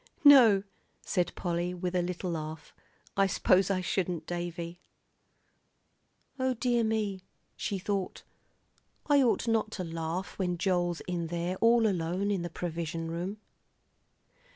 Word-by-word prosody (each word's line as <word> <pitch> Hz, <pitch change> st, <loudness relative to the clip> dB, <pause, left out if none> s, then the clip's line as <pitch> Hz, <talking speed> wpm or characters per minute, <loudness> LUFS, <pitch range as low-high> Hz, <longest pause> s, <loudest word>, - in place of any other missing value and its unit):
"No," 240 Hz, -9 st, +8 dB, 0.4 s
said 175 Hz, -2 st, 0 dB
Polly, 175 Hz, 0 st, -2 dB
with 180 Hz, 0 st, -3 dB
a 180 Hz, -, +3 dB
little 180 Hz, 0 st, -3 dB
laugh, 155 Hz, -1 st, -6 dB, 0.4 s
"I 195 Hz, 0 st, +4 dB
s'pose 185 Hz, 0 st, +3 dB
I 190 Hz, -2 st, +1 dB
shouldn't, 180 Hz, -3 st, -1 dB
Davie." 175 Hz, 0 st, -5 dB, 1.6 s
O 260 Hz, 0 st, +1 dB
dear 240 Hz, 0 st, +1 dB
me, 215 Hz, -4 st, -1 dB, 0.3 s
she 200 Hz, -, -2 dB
thought, 195 Hz, 0 st, -3 dB, 0.8 s
I 290 Hz, -2 st, +5 dB
ought 245 Hz, -1 st, +2 dB
not 225 Hz, -1 st, +1 dB
to 185 Hz, -, -3 dB
laugh 165 Hz, +3 st, -4 dB
when 180 Hz, -2 st, 0 dB
Joel's 175 Hz, -2 st, 0 dB
in 175 Hz, -2 st, -3 dB
there 175 Hz, +2 st, -2 dB
all 230 Hz, +1 st, +4 dB
alone 185 Hz, +1 st, 0 dB
in 195 Hz, -3 st, 0 dB
the 175 Hz, -, -4 dB
provision 165 Hz, -1 st, -4 dB
room. 180 Hz, +5 st, -4 dB
180 Hz, 130 wpm, -30 LUFS, 170-205 Hz, 1.6 s, No